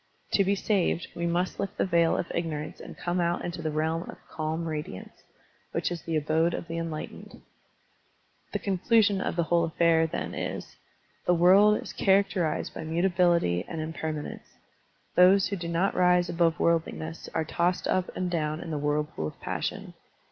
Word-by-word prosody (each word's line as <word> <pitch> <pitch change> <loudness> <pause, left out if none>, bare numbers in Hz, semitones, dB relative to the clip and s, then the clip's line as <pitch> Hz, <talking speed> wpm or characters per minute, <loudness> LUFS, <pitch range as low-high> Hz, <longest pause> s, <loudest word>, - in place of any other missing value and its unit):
To 200 - +4
be 195 +1 +2
saved, 190 -4 0
we 170 0 -1
must 175 +2 -1
lift 200 0 -3
the - - +2
veil 170 -3 +3
of - - -1
ignorance 155 -3 -3
and - - -10
come 175 +1 -1
out 170 0 0
into 175 -1 -4
the 160 - -1
realm 160 +3 -1
of - - -8
"calm 160 +1 -3
radiance/' 150 - -6 0.5
which - - -1
is 170 -2 -4
the 165 - -3
abode 160 +3 +1
of - - -6
the 165 0 -3
enlightened.. 165 -2 -6 1.1
The - - 0
conclusion 200 +1 +2
of - - -2
the 170 - +2
whole 170 +1 +2
affair, 165 0 +3
then, - - -4
is: - - -5 0.5
The 180 - +5
world 195 +5 +6
is - - -8
characterized 190 -5 +1
by - - -6
mutability 170 - +2
and 165 - -5
impermanence; 155 -1 -5 0.6
those 185 +2 +6
who 200 - -1
do 170 -3 -5
not 170 +4 +1
rise 180 -1 +3
above 165 -1 +1
worldliness 165 -1 -1
are 160 - +1
tossed 175 +3 0
up 185 -1 +1
and 180 -1 -2
down 155 -2 -1
in 165 - -6
the 150 - -2
whirl 150 +1 +1
pool 150 - -5
of - - -10
passion. - - -4
170 Hz, 175 wpm, -28 LUFS, 160-180 Hz, 1.1 s, world